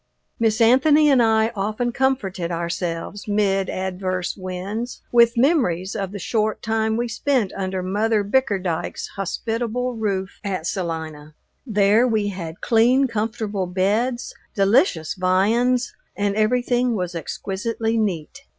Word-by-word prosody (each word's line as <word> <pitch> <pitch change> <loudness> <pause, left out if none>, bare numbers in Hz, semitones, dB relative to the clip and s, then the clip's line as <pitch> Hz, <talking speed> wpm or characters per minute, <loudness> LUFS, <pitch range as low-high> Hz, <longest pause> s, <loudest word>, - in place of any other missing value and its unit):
Miss 225 -1 +2
Anthony 290 +6 +5
and 260 -3 +5
I 220 -1 +3
often 215 +2 -2
comforted 210 -10 -1
ourselves 170 +3 -4
mid 195 -2 +1
adverse 185 -1 -3
winds 195 +5 -5
with 235 0 +5
memories 230 - +2
of 195 -3 -3
the 205 - -6
short 215 +2 -1
time 220 0 0
we 240 +1 -1
spent 235 -2 0
under 190 -1 -3
Mother 210 +3 +1
Bickerdyke's 200 -7 -1
hospitable 230 +5 -2
roof 200 -4 -3
at 190 -5 -3
Salina. 160 -4 -4 0.3
There 210 +2 +4
we 215 -3 +1
had 170 -4 -7
clean, 245 +4 +4
comfortable 215 -4 -2
beds, 215 +7 0 0.2
delicious 195 - +2
viands, 225 +7 +1 0.2
and 200 0 0
everything 245 +2 +1
was 180 -3 -3
exquisitely 220 +7 -3
neat. 210 - -2
210 Hz, 125 wpm, -22 LUFS, 185-235 Hz, 0.3 s, Anthony